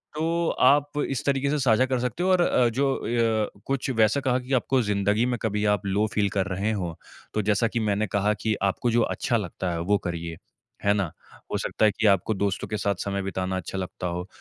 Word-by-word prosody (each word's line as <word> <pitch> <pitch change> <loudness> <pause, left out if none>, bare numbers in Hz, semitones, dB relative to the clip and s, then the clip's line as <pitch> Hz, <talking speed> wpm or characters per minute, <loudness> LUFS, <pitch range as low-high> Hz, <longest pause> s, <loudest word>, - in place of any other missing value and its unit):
तो 165 +2 0
आप 145 +3 +3 0.2
इस 135 - -2
तरीके 140 0 +1
से 150 - +1
साझा 130 -1 +3
कर 130 -1 -1
सकते 125 +8 -2
हो 185 - +2
और 185 -1 +4
अ, 125 -7 +3
जो 135 +4 +1
अ, 115 -2 0 0.2
कुछ 135 -1 -1
वैसा 110 +5 +4
कहा 130 -1 +1
कि 130 +2 -5
आपको 130 +1 +2
ज़िंदगी 105 +1 +1
में 125 -1 -1
कभी 105 -1 -1
आप 100 - -9
लो 100 +2 +1
फील 105 -1 +2
कर 100 0 -1
रहे 100 +3 -1
हों 90 -6 -2 0.4
तो 110 - +1
जैसा 105 +3 +2
कि 120 +1 -2
मैंने 105 -1 0
कहा 105 +1 +1
कि 110 -1 +1
आपको 100 +5 +1
जो 120 +1 +3
अच्छा 120 +1 0
लगता 95 -2 -3
है 85 - -2
वो 100 +4 +2
करिए। 85 -2 -5 0.5
है 100 - +4
ना? 100 -6 -1 0.4
हो - - 0
सकता 110 - 0
है 105 - +5
कि 110 - +1
आपको 100 +2 +3
दोस्तों 100 -1 -1
के 105 - -3
साथ 100 -1 0
समय 100 0 -2
बिताना 95 -1 -2
अच्छा 95 +1 -5
लगता 90 -1 -4
हो, 90 +1 -4
110 Hz, 230 wpm, -25 LUFS, 100-125 Hz, 0.5 s, है